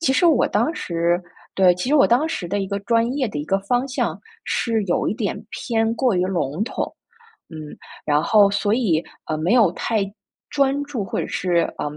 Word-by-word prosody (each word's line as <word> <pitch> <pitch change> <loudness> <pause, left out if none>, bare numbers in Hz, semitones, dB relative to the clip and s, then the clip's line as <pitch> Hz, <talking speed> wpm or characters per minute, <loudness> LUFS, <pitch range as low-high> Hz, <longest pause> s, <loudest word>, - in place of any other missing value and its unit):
其 265 -5 +2
实 350 - +3
我 295 -7 +4
当 235 - 0
时 170 +1 -1 0.3
对， 185 -2 +5
其 180 +7 -3
实 290 - +3
我 280 - +6
当 265 +7 +3
时 180 - -4
的 200 +3 -1
一 195 - -2
个 200 - -2
专 230 +3 +1
业 270 -4 0
的 175 - -5
一 145 - -3
个 195 +5 +1
方 245 +6 0
向， 265 - -2 0.2
是 225 -2 0
有 175 - 0
一 - - -1
点 - - -3
偏 225 -2 -1
过 245 -2 +1
于 180 - +2
笼 175 -1 -1
统。 - - -4 0.6
嗯， - - -7 0.5
然 150 0 +2
后 205 -2 +5
所 205 0 0
以， 185 -10 +1 0.2
呃， 155 - -2
没 160 +6 0
有 230 -7 +5
太 220 +3 -1 0.5
专 280 0 +1
注， 270 -8 -4
或 - - -3
者 - - -3
是， 175 -2 +1
嗯， 150 0 -4
210 Hz, 225 characters per minute, -22 LUFS, 180-250 Hz, 0.6 s, 我